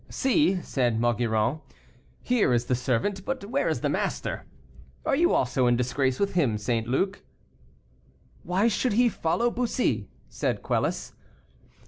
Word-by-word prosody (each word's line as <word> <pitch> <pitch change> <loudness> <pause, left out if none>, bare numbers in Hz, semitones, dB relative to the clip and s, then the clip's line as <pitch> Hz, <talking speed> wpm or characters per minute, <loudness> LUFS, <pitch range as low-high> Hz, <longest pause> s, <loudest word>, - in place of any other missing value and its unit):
"See," 265 - +2
said 120 -4 0
Maugiron, 120 +3 +1 0.6
"here 240 - +2
is 120 0 +1
the 125 - 0
servant, 130 - -1
but 260 -3 -4
where 260 +7 0
is - - -1
the - - +1
master? - - -2 0.6
Are 290 - +2
you 345 +4 +3
also 125 0 +2
in 120 - +4
disgrace 130 +1 0
with 200 0 0
him, 135 - +2
St. 115 +1 -1
Luc?" 190 +11 0 1.2
"Why 190 +5 +1
should 235 +1 +1
he 240 +3 +4
follow 230 +6 0
Bussy?" 245 +1 -1 0.2
said - - -2
Quelus. - - -1
155 Hz, 140 wpm, -26 LUFS, -, 1.2 s, in